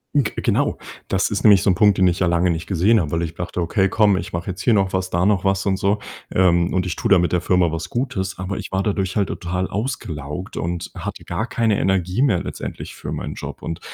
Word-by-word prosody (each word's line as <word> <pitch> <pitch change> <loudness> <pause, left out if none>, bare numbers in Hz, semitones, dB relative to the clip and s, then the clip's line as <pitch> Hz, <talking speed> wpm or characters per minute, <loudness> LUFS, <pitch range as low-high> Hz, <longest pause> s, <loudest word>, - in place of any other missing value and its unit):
G 140 -6 +2
genau, - - +1 0.3
das 95 0 +1
ist 100 - -2
nämlich 100 -5 +6
so 100 - +4
'n - - +3
Punkt, 105 -1 +4
den 95 - +4
ich 90 +1 +1
ja 90 - +2
lange 85 +1 +2
nicht 80 0 -4
gesehen 100 +5 +3
habe, 75 - -3
weil 85 0 0
ich 80 -1 -4
dachte: 90 +1 -5
„Okay, 95 +3 +1
komm, 105 -1 +4
ich 90 0 -5
mache 85 +2 -3
jetzt 95 0 -7
hier 115 +4 +3
noch 95 -2 +1
was, 95 0 -1
da 85 +1 +1
noch 100 -2 +2
was“, 95 -1 +1
und 95 -1 +1
so. 100 +2 +1 0.3
Ähm, 85 -2 +3
und 90 0 0
ich 90 - -3
tue - - -2
damit 90 -3 +4
der 90 - +1
Firma 90 -2 +2
was 80 +2 -4
Gutes, 110 -7 -2
aber 90 +1 -4
ich - - -7
war 95 0 0
dadurch 95 -3 -1
halt 100 -2 +1
total 90 +2 -2
ausgelaugt 90 - -4
und 85 0 -3
hatte - - -6
gar 110 - -2
keine 115 -4 +1
Energie 95 +3 +1
mehr 115 -11 +2
letztendlich - - -6
für - - -7
meinen - - -4
Job - - -8
und 80 - -4
95 Hz, 250 wpm, -21 LUFS, 85-100 Hz, 0.3 s, nämlich